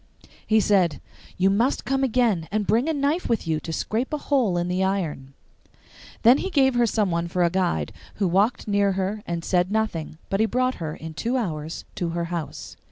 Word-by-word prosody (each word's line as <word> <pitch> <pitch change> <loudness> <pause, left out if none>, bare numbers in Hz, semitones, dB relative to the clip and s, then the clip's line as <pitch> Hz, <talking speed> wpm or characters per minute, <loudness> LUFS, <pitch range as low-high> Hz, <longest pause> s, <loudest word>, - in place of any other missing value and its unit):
He 220 0 +4
said, 185 -8 +2 0.4
'You 190 +1 +3
must 235 +7 +1
come 270 +1 0
again, 230 -10 +1
and 210 0 0
bring 235 +10 +2
a - - +3
knife 290 +4 0
with 230 - 0
you 160 -1 0
to 165 - -6
scrape 225 +9 -2
a 300 - 0
hole 255 -11 +1
in 175 0 0
the 180 +1 0
iron.' 160 -9 -2 0.9
Then 245 +4 +7
he 385 - -2
gave 270 -6 +3
her 240 -1 +3
someone 180 -6 0
for 175 +1 0
a 170 - +2
guide, 185 -1 0 0.2
who 200 - 0
walked 200 +8 +1
near 200 -1 +2
her 195 +3 -2
and 170 -1 -3
said 180 +1 +1
nothing, 205 -8 -2
but 195 - -1
he 220 - +3
brought 255 +2 +1
her 155 -2 -3
in 160 0 -8
two 235 +10 -1
hours 160 -8 -4
to 175 - -1
her 170 - -1
house. 165 -4 -6
195 Hz, 205 wpm, -24 LUFS, 170-240 Hz, 0.9 s, Then